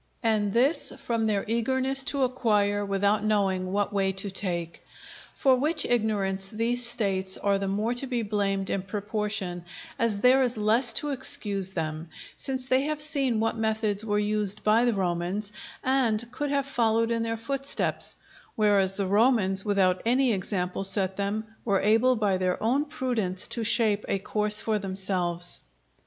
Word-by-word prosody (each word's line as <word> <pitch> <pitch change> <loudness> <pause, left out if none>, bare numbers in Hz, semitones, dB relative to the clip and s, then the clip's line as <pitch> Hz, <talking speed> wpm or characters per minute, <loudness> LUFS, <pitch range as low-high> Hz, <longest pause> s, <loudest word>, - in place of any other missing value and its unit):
And 215 -3 +1
this 260 +9 +2
from 230 -2 -2
their 205 -2 -1
eagerness 260 +4 +1
to 280 -1 -1
acquire 210 -5 0
without 200 +1 0
knowing 195 -3 0
what 205 +1 -1
way 195 -1 +1
to 195 +1 -5
take. 175 -4 -4 0.5
For 265 -2 +3
which 305 +3 0
ignorance 200 -5 0
these 235 +2 0
States 195 -6 +2
are 200 -1 0
the 195 - -3
more 210 +5 -1
to 245 +3 -2
be 245 -3 -2
blamed 200 -2 -2
in 195 - -1
proportion 205 -2 -4 0.4
as 220 -3 0
there 255 +2 +5
is 245 -3 0
less 225 +4 +4
to 295 - +1
excuse 225 -8 +2
them; 160 -2 -5 0.3
since 260 -2 -3
they 260 0 +2
had 305 0 -2
seen 280 -7 +1
what 225 +1 -1
methods 220 -2 -1
were 210 -2 -1
used 210 -1 -1
by 220 +3 +3
the 240 - +2
Romans, 185 +2 -2 0.3
and 240 -3 0
could 290 +3 -4
have 280 -1 0
followed 230 -3 0
in 230 0 0
their 225 0 -2
footsteps; 275 +4 -1 0.4
whereas 200 -3 +2
the 200 - -2
Romans, 200 -2 +2
without 190 -3 +1
any 250 +1 +2
example 185 -1 -3
set 195 -1 +3
them, 200 +2 -2 0.2
were 200 -4 +1
able 225 +5 +3
by 205 -4 0
their 185 -1 -1
own 265 +6 +1
prudence 240 -11 -1
to 230 - -3
shape 220 -2 +1
a - - +1
course 210 +1 +3
for 215 -1 -1
themselves. 185 -3 0
210 Hz, 165 wpm, -26 LUFS, 195-240 Hz, 0.5 s, there